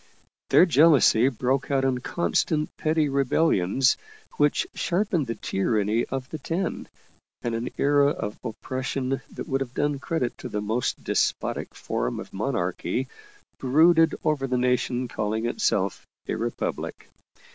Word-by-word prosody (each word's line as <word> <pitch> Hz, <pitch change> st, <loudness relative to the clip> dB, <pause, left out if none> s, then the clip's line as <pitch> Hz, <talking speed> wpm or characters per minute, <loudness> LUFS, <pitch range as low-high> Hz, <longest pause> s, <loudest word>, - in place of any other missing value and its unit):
Their -, -, +7 dB
jealousy 145 Hz, -7 st, +5 dB
broke 130 Hz, +2 st, -1 dB
out 135 Hz, -1 st, +2 dB
in 130 Hz, -2 st, +1 dB
constant 155 Hz, +1 st, -1 dB
petty 155 Hz, -1 st, +1 dB
rebellions 135 Hz, -, +2 dB, 0.4 s
which 145 Hz, 0 st, +2 dB
sharpened 175 Hz, -, 0 dB
the 115 Hz, -, -3 dB
tyranny 105 Hz, +2 st, 0 dB
of 135 Hz, -1 st, -4 dB
the 155 Hz, -, -5 dB
Ten, 170 Hz, +6 st, -3 dB, 0.6 s
and 120 Hz, -, -1 dB
an 115 Hz, +2 st, -2 dB
era 145 Hz, 0 st, +4 dB
of 105 Hz, -7 st, -4 dB
oppression 130 Hz, +3 st, -3 dB
that -, -, -7 dB
would 135 Hz, 0 st, -1 dB
have 130 Hz, -2 st, -5 dB
done 145 Hz, -1 st, 0 dB
credit 140 Hz, -4 st, -2 dB
to -, -, -6 dB
the 105 Hz, -, -2 dB
most 110 Hz, +4 st, -2 dB
despotic -, -, -1 dB
form -, -, -2 dB
of -, -, -9 dB
monarchy 130 Hz, +1 st, -2 dB, 0.5 s
brooded 160 Hz, +5 st, +4 dB
over 150 Hz, -4 st, 0 dB
the 125 Hz, -1 st, 0 dB
nation 125 Hz, 0 st, 0 dB
calling 110 Hz, 0 st, -2 dB
itself 165 Hz, -, 0 dB, 0.2 s
a -, -, -1 dB
Republic. -, -, -4 dB
135 Hz, 135 wpm, -25 LUFS, 120-150 Hz, 0.6 s, Their